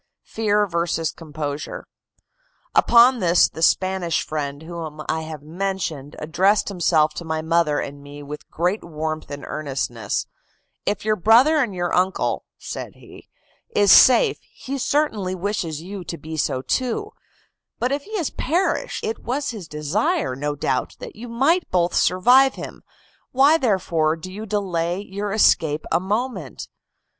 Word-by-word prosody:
FEAR 210 -1 +1
VERSUS 170 -3 -1
COMPOSURE 150 -2 -6 0.9
"Upon 245 +1 +6
this 175 -2 +4
the 160 - -10
Spanish 185 -1 +1
friend 145 -1 -4
whom 160 -2 -7
I 160 - -1
have 155 -2 -8
mentioned, 165 -4 -4
addressed 185 +7 +1
himself 160 -5 +2
to 170 - -6
my 160 -1 -3
mother 160 -2 +2
and 140 0 -6
me 145 +1 -10
with 150 +1 -9
great 180 +6 -1
warmth 155 -1 -4
and 145 -1 -7
earnestness; 135 -7 -3 0.6
'If 210 - -1
your 215 0 +2
brother 240 - +5
and 235 -9 0
your 175 -1 -2
uncle,' 185 +1 0
said - - -7
he, - - -15 0.5
'is 205 -2 +5
safe, 415 - +7
he 275 +1 -7
certainly 225 -10 0
wishes 175 -5 -3
you 195 +1 -7
to 170 - -5
be 160 +1 -7
so 130 -4 -1
too; 260 - -1 0.7
but 250 +2 -1
if 285 +1 0
he 435 0 -4
has 335 -7 -2
perished, 350 - -1
it 225 - -3
was 270 +4 -2
his 205 -8 -8
desire, 165 - -1
no 145 +2 -3
doubt, 130 -2 -1
that - - -9
you 235 +2 -9
might 285 +10 +2
both 175 -1 +1
survive 250 +9 +4
him: - - -8 0.5
why 275 +4 +6
therefore 170 - +1
do 185 +3 -9
you 215 +3 -7
delay 180 -4 -1
your 200 0 -5
escape 160 -7 +3
a - - +3
moment? 200 - -3
180 Hz, 150 wpm, -22 LUFS, 155-225 Hz, 0.9 s, safe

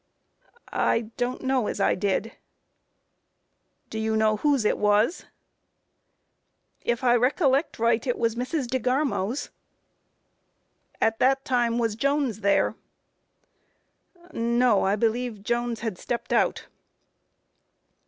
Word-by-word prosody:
A. - - -11
I 230 - +2
don't 245 +2 -3
know 260 -4 +1
as - - -4
I - - +3
did. 195 0 0
Q. 225 +3 -12 1.6
Do 220 - -4
you 220 0 0
know 215 0 +2
whose 275 -2 +1
it - - +1
was? 210 - +2 1.6
A. - - -4
If 235 +1 0
I 240 -1 +4
recollect 270 +4 +1
right, 230 +2 +1
it 245 - 0
was 230 -1 +1
Mrs. 255 +4 -2
DeGarmo's. 255 -2 -1
Q. - - -41 1.5
At 225 0 +1
that 270 +1 +2
time 240 -2 +1
was 230 -3 0
Jones 275 -2 0
there? 200 -1 +2 1.6
A. - - -18
No, 235 -2 +2
I 195 +1 +2
believe 225 -1 -1
Jones 235 0 -2
had 220 -6 -4
stepped 235 -1 -3
out. - - +1
235 Hz, 125 wpm, -25 LUFS, 220-255 Hz, 1.6 s, I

